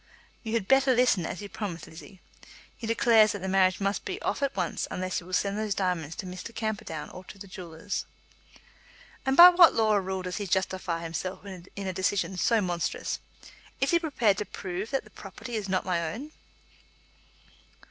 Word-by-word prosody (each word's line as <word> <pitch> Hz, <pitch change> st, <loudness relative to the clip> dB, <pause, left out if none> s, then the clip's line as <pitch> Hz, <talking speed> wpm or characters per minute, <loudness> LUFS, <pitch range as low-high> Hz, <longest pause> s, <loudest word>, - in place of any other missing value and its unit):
"You 220 Hz, -1 st, -5 dB
had 225 Hz, -5 st, 0 dB
better 270 Hz, 0 st, +4 dB
listen, 235 Hz, -8 st, +3 dB
as 205 Hz, -, -5 dB
you -, -, -5 dB
promised, 180 Hz, -5 st, -5 dB
Lizzie. 170 Hz, +3 st, -13 dB, 0.5 s
He 230 Hz, -, -7 dB
declares 225 Hz, -1 st, +5 dB
that 200 Hz, -2 st, -6 dB
the -, -, -2 dB
marriage 185 Hz, -1 st, +3 dB
must 200 Hz, +1 st, -1 dB
be -, -, -4 dB
off -, -, -1 dB
at 280 Hz, -, 0 dB
once 180 Hz, -3 st, -2 dB
unless 185 Hz, 0 st, -2 dB
you 175 Hz, -, -13 dB
will 185 Hz, -, -10 dB
send 200 Hz, +3 st, +1 dB
those 215 Hz, -2 st, -1 dB
diamonds 175 Hz, -5 st, -1 dB
to -, -, -6 dB
Mr. 185 Hz, +5 st, -8 dB
Camperdown 205 Hz, -8 st, -4 dB
or 185 Hz, -, -10 dB
to 200 Hz, -, -11 dB
the 200 Hz, -, -9 dB
jewellers." 185 Hz, +1 st, -5 dB, 1.2 s
"And 265 Hz, +1 st, +2 dB
by 350 Hz, +1 st, +13 dB
what 350 Hz, -2 st, +7 dB
law 220 Hz, -1 st, +3 dB
or 205 Hz, -1 st, +3 dB
rule 190 Hz, 0 st, -3 dB
does 180 Hz, 0 st, -4 dB
he 205 Hz, -, -3 dB
justify 185 Hz, -2 st, -1 dB
himself 170 Hz, +4 st, -5 dB
in 190 Hz, -2 st, -9 dB, 0.2 s
a 185 Hz, -, -2 dB
decision 190 Hz, +1 st, 0 dB
so 225 Hz, +5 st, +3 dB
monstrous? 175 Hz, -3 st, -2 dB, 0.6 s
Is 270 Hz, -, +2 dB
he 340 Hz, -, +4 dB
prepared 235 Hz, -, +1 dB
to 210 Hz, -, -2 dB
prove 190 Hz, +2 st, -5 dB
that 270 Hz, -, -1 dB
the -, -, -18 dB
property 205 Hz, +5 st, -9 dB
is 205 Hz, -3 st, -3 dB
not 185 Hz, -1 st, 0 dB
my 170 Hz, -3 st, 0 dB
own?" 280 Hz, -, -7 dB
195 Hz, 195 wpm, -28 LUFS, 180-220 Hz, 1.2 s, by